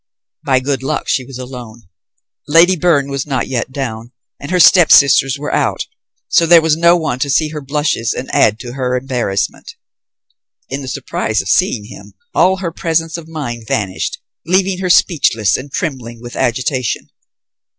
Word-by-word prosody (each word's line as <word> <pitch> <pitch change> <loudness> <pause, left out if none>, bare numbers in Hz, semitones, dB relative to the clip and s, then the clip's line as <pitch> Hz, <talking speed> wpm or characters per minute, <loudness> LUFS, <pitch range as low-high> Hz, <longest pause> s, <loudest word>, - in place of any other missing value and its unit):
By 130 -1 +2
good 135 -1 -2
luck, 145 +3 -3
she 130 - 0
was 125 0 -10
alone. 125 -3 -9 0.6
Lady 165 +5 +5
Byrne 150 -5 +1
was 140 0 -3
not 135 -3 -2
yet 130 0 -3
down, 120 -4 -5 0.3
and 145 - -8
her 180 0 +1
stepsisters 140 -6 +6
were 145 +1 -5
out; - - 0 0.4
so 165 - +3
there 170 0 +8
was 160 -1 +2
no 170 +2 +4
one 155 -7 -3
to 140 - -1
see 155 +3 +2
her 150 -1 -6
blushes 140 -5 -1
and 130 - -5
add 110 0 +3
to 120 -1 -8
her 125 -1 -2
embarrassment. 125 -7 -3 0.9
In 135 +2 -4
the 135 - -8
surprise - - -2
of - - -4
seeing 105 - +1
him, 110 - -13 0.2
all 185 +1 +3
her 180 -3 -4
presence 165 0 -1
of 170 -2 -8
mind 120 -8 -6
vanished, 95 -5 -2 0.3
leaving 185 +2 +1
her 185 -1 -2
speechless 115 - +3
and 135 +2 -6
trembling 125 -6 -4
with 120 +1 -10
agitation. 130 0 -2
140 Hz, 170 wpm, -16 LUFS, 125-160 Hz, 0.9 s, there